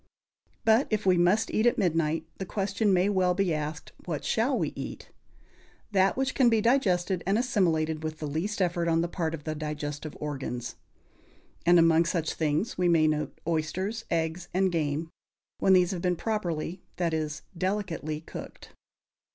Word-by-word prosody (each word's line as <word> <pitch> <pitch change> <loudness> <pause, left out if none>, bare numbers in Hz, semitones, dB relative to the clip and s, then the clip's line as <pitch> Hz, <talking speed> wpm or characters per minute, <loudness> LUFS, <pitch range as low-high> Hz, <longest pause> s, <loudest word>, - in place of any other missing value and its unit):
But, 225 +4 +4
if 215 -2 -1
we 185 -1 +5
must 180 +5 +3
eat 220 +3 +2
at 240 - +3
midnight, 165 -3 +1
the 190 - -3
question 205 +2 0
may 185 +1 +3
well 185 -3 +2
be 190 -3 +1
asked, 155 +1 -4
What - - -4
shall - - +1
we - - -1
eat? - - -7 0.8
That 195 +1 +3
which 265 -1 0
can 255 -3 +4
be 225 -1 +3
digested 195 -7 +2
and 195 +2 +3
assimilated 165 - +1
with 155 0 -4
the 155 - -5
least 175 +8 -1
effort 175 -1 0
on 165 0 +3
the 170 - 0
part 165 -2 -2
of 150 - -11
the 155 - -3
digestive 150 0 -5
organs. 135 -5 -4 0.9
And 175 0 +7
among 165 0 +5
such 165 -2 -1
things 160 +8 -1
we 180 - +3
may 165 -2 +4
note 150 0 -2
oysters, 180 +7 -2
eggs 165 +1 -1
and 190 0 +3
game, 160 0 -1 0.5
when 190 - +4
these 180 0 +4
have 180 -3 -3
been 180 0 +1
properly 180 -4 -3
that 170 -2 -1
is, 155 -1 -3
delicately 170 -5 -2
cooked. - - -10
175 Hz, 170 wpm, -28 LUFS, 155-195 Hz, 0.9 s, And